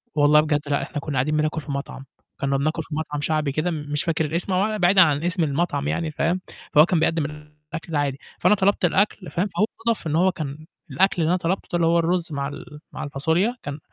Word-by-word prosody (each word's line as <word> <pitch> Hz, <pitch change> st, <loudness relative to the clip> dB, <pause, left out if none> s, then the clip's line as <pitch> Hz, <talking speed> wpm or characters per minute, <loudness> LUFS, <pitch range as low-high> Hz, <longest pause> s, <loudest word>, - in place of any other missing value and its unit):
والله 150 Hz, 0 st, +5 dB
بجد، 150 Hz, -1 st, 0 dB
لأ 140 Hz, 0 st, +1 dB
إحنا -, -, -4 dB
كنّا 145 Hz, +1 st, -5 dB
قاعدين 150 Hz, +4 st, +1 dB
بناكل 155 Hz, +1 st, 0 dB
في 145 Hz, -, -7 dB
مَطعم، 140 Hz, -1 st, -5 dB, 0.4 s
كنّا 140 Hz, 0 st, +1 dB
بناكل 155 Hz, +3 st, -1 dB
في 150 Hz, -, -7 dB
مَطعم 150 Hz, -2 st, -3 dB
شعبي 155 Hz, -1 st, 0 dB
كده 155 Hz, +5 st, -1 dB
مش 150 Hz, -2 st, -2 dB
فاكر 160 Hz, -1 st, 0 dB
الاسم 170 Hz, +5 st, -1 dB
أو 210 Hz, +4 st, +1 dB
بعيدًا 185 Hz, 0 st, +5 dB
عن 150 Hz, -3 st, +3 dB
اسم 175 Hz, 0 st, 0 dB
المَطعم 145 Hz, -1 st, -1 dB
يعني 165 Hz, 0 st, -1 dB
فاهم، 170 Hz, +4 st, 0 dB, 0.3 s
فهو 150 Hz, +1 st, +8 dB
كان 175 Hz, -2 st, +1 dB
بيقدم 160 Hz, -1 st, +1 dB
الأكل 150 Hz, +2 st, -9 dB
ده 150 Hz, -, +1 dB
عادي، 140 Hz, -1 st, -1 dB, 0.2 s
فأنا 210 Hz, -, +4 dB
طلبت 195 Hz, -1 st, +2 dB
الأكل 190 Hz, +1 st, 0 dB
فاهم، 180 Hz, +4 st, 0 dB
فهو 205 Hz, +2 st, +1 dB, 0.2 s
صادف 230 Hz, -7 st, 0 dB
إن 155 Hz, -, 0 dB
هو 185 Hz, +3 st, +4 dB
كان 155 Hz, -2 st, -6 dB, 0.3 s
الأكل 190 Hz, -2 st, +2 dB
اللي 160 Hz, -, +2 dB
أنا 180 Hz, -, +3 dB
طلبته 185 Hz, +2 st, -2 dB
ده -, -, -1 dB
اللي 170 Hz, -1 st, +2 dB
هو 170 Hz, +1 st, +4 dB
الرز 170 Hz, +1 st, 0 dB
مع 140 Hz, -1 st, -2 dB
ال 150 Hz, +1 st, -9 dB
مع -, -, -6 dB
الفاصوليا 160 Hz, -, 0 dB
كان 145 Hz, +1 st, -5 dB
155 Hz, 230 wpm, -23 LUFS, 145-175 Hz, 0.4 s, فهو